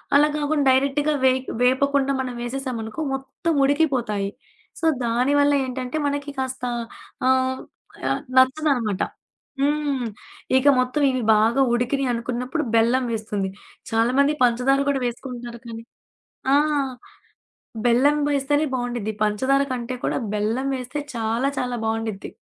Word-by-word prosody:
అలా 295 Hz, +1 st, +6 dB
గాకుండా 295 Hz, -1 st, 0 dB
డైరెక్టుగా 280 Hz, +3 st, +2 dB
వెయికి 260 Hz, 0 st, +2 dB
వేపకుండా 275 Hz, +2 st, +2 dB
మనం 255 Hz, -1 st, -4 dB
వేసేశామనుకో 245 Hz, 0 st, -4 dB
మొత్తం 270 Hz, +5 st, -3 dB
ఉడికిపోతాయి. 255 Hz, -9 st, +1 dB, 0.5 s
సో, 325 Hz, -, -2 dB, 0.2 s
దానివల్ల 285 Hz, +5 st, +3 dB
ఏంటంటే 255 Hz, +3 st, -4 dB
మనకి 285 Hz, 0 st, -3 dB
కాస్త 260 Hz, -1 st, -4 dB, 0.6 s
ఆహ్, 260 Hz, 0 st, +2 dB, 0.5 s
ఆహ్, -, -, 0 dB, 0.2 s
నచ్చదనమాట. 260 Hz, -6 st, +3 dB, 0.6 s
హ్మ్. 285 Hz, -3 st, 0 dB, 0.5 s
ఇక 260 Hz, +2 st, +2 dB
మొత్తం 255 Hz, +4 st, 0 dB
ఇవి 255 Hz, -2 st, -1 dB
బాగా 230 Hz, +5 st, +3 dB
ఉడికినియి 255 Hz, +2 st, 0 dB
అనుకున్నప్పుడు 250 Hz, +6 st, -2 dB
బెల్లం 240 Hz, +3 st, +3 dB
వేస్తుంది. 210 Hz, -3 st, -2 dB, 0.4 s
చాలామంది 255 Hz, +6 st, +3 dB
పంచదార 250 Hz, +3 st, +3 dB
కూడా 270 Hz, -2 st, 0 dB
వేసుకుంటారు 240 Hz, -1 st, -6 dB
కానీ 230 Hz, 0 st, -7 dB, 0.7 s
ఆ! -, -, +6 dB, 1.3 s
బెల్లం 260 Hz, +5 st, +4 dB
వేస్తేనే 290 Hz, +2 st, +1 dB
బావుండిద్ది. 240 Hz, -4 st, -2 dB
పంచదార 260 Hz, +7 st, +2 dB
కంటే 250 Hz, 0 st, -3 dB
కూడా -, -, 0 dB, 0.2 s
బెల్లం 225 Hz, +6 st, -1 dB
వేస్తే 255 Hz, +3 st, -5 dB, 0.2 s
చాలా 230 Hz, +4 st, 0 dB
చాలా 245 Hz, -1 st, -2 dB
బావుండిద్ది. 220 Hz, -2 st, -3 dB
260 Hz, 115 wpm, -23 LUFS, 235-280 Hz, 1.3 s, అలా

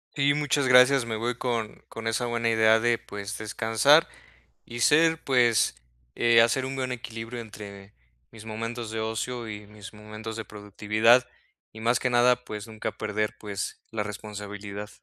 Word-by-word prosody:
Sí, 140 Hz, 0 st, +3 dB
muchas 145 Hz, -2 st, 0 dB
gracias, 130 Hz, 0 st, +6 dB
me 115 Hz, -1 st, -3 dB
voy 120 Hz, +3 st, -2 dB
con 115 Hz, -4 st, -3 dB
con 115 Hz, 0 st, -7 dB
esa 115 Hz, +2 st, 0 dB
buena 120 Hz, -1 st, 0 dB
idea 110 Hz, 0 st, +4 dB
de, 120 Hz, +1 st, +2 dB
pues, 100 Hz, 0 st, -7 dB
descansar 115 Hz, +8 st, +3 dB, 0.6 s
y 120 Hz, -, -8 dB
ser 160 Hz, +5 st, +4 dB
pues, 120 Hz, -4 st, +3 dB, 0.4 s
eh, 115 Hz, -1 st, +5 dB
hacer 120 Hz, +3 st, +2 dB
un 135 Hz, +1 st, -4 dB
buen 130 Hz, -1 st, -3 dB
equilibrio 115 Hz, -1 st, -6 dB
entre 105 Hz, -3 st, -10 dB, 0.4 s
mis 110 Hz, -2 st, -12 dB
momentos 115 Hz, +1 st, -5 dB
de 110 Hz, 0 st, -4 dB
ocio 115 Hz, +2 st, -3 dB
y 105 Hz, -1 st, -8 dB
mis 105 Hz, -1 st, -12 dB
momentos 110 Hz, +1 st, -8 dB
de 115 Hz, -, -5 dB
productividad, 105 Hz, +4 st, +2 dB, 0.4 s
y 110 Hz, -, -11 dB
más 120 Hz, +2 st, +2 dB
que 125 Hz, -, 0 dB
nada, 125 Hz, 0 st, +3 dB
pues 105 Hz, 0 st, -7 dB
nunca 110 Hz, -1 st, -5 dB
perder, 105 Hz, 0 st, -2 dB
pues, 100 Hz, -2 st, -5 dB
la 110 Hz, -1 st, -2 dB
responsabilidad. 105 Hz, -1 st, -7 dB
115 Hz, 165 wpm, -26 LUFS, 105-120 Hz, 0.6 s, gracias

